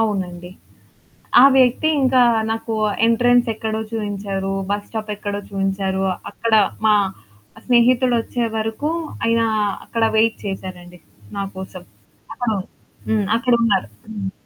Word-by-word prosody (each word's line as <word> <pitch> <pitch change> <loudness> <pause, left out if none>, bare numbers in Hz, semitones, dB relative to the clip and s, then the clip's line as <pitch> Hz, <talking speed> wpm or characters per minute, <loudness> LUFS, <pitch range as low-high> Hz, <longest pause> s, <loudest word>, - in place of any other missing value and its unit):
అవునండి. 180 -5 -2 0.9
ఆ - - +8
వ్యక్తి 255 +4 +3
ఇంకా 260 -1 +4 0.3
నాకు 225 0 -3 0.3
ఎంట్రన్స్ 245 +1 +3
ఎక్కడో 220 0 -3
చూయించారు, 200 -2 -3 0.2
బస్ 205 0 -2
స్టాప్ 220 -1 -5
ఎక్కడో 205 0 -4
చూయించారు. 195 -1 -1 0.3
అక్కడ 230 -1 -2 0.3
మా 215 -1 +5 0.7
స్నేహితుడొచ్చే 245 -1 +2
వరకు 225 +7 -2 0.4
ఆయన 230 0 +2 0.4
అక్కడ 230 -1 -2
వెయిట్ 225 +1 +3
చేసారండి 180 -2 -7 0.4
నాకోసం. 190 -2 -6 0.5
అక్కడో 225 -3 -1 0.5
హ్మ్. 215 -2 +1
అక్కడ 250 +1 +1
ఉన్నారు. 205 - +2 0.2
హ్మ్. 200 -3 -4
220 Hz, 110 wpm, -20 LUFS, 195-235 Hz, 0.9 s, ఆ